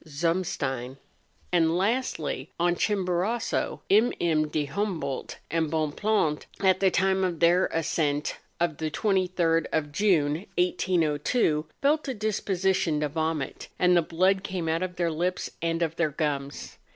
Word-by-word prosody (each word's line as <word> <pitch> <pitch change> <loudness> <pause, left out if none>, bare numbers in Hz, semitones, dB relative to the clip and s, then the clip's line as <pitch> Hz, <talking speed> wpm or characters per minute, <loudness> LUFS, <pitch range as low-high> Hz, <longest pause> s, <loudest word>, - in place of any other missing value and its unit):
Zumstein; 145 -5 -2 0.6
and 165 -1 +3
lastly, 190 - -1
on 175 0 +3
Chimborazo, 195 +3 -1
MM. 170 -8 +2
de 150 -1 0
Humboldt 155 -4 -3
and 165 -1 +1
Bon 155 -1 0
pland, 205 -5 0
at 190 -1 +3
the 195 - +4
time 190 +1 +2
of 175 -3 -1
their 175 +2 +4
ascent 155 -2 -1 0.2
of 170 -3 0
the 160 -1 -2
23rd 180 -3 +1
of 150 -2 -1
June, 170 -2 +1
1802, 165 - +1 0.2
felt 300 +2 +2
a 265 - -2
disposition 190 -6 0
to 150 - 0
vomit, 160 -2 -3
and 180 0 +4
the 175 - +5
blood 185 +4 +1
came 185 -4 -3
out 165 +2 0
of 185 -1 -3
their 170 -1 0
lips 180 +3 -2
and 165 0 0
of 165 0 -2
their 170 -2 +2
gums. 140 -2 -4
170 Hz, 140 wpm, -27 LUFS, 155-190 Hz, 0.6 s, the